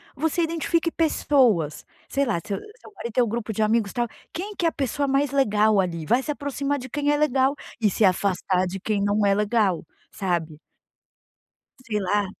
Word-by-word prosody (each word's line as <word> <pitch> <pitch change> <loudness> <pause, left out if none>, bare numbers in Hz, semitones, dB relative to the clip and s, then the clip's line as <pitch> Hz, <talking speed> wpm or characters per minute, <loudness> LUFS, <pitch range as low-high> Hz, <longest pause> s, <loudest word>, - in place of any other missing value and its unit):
você 320 +4 0
identifique 335 +1 0
pessoas. 255 - +2 0.2
Sei 280 0 +1
lá, 225 -9 0
se 205 - -4 0.3
seu - - -14
marido 235 - -6
tem 250 - +4
um - - -1
grupo 225 0 -3
de 215 - -2
amigos, 215 -1 +1
tal. 240 -1 0 0.3
Quem 405 +4 -5
que 350 - -1
é 330 - +5
a - - -10
pessoa 280 +1 -1
mais 275 0 +1
legal 215 -6 +3
ali? 170 -4 -1
Vai 240 +9 +3
se 300 - -2
aproximar 285 0 -2
de 260 +1 -8
quem 290 +2 0
é 295 - +2
legal 275 -2 +2 0.2
e 215 -3 +3
se 205 - 0
afastar 185 -1 +1
de 190 +2 -5
quem 210 +1 -1
não 205 +1 +2
é 200 - +4
legal. 205 -5 +1 0.3
Sabe. 170 -6 -2 1.3
Sei 210 -3 -2
lá 205 +2 +1
230 Hz, 195 wpm, -24 LUFS, 200-285 Hz, 1.3 s, é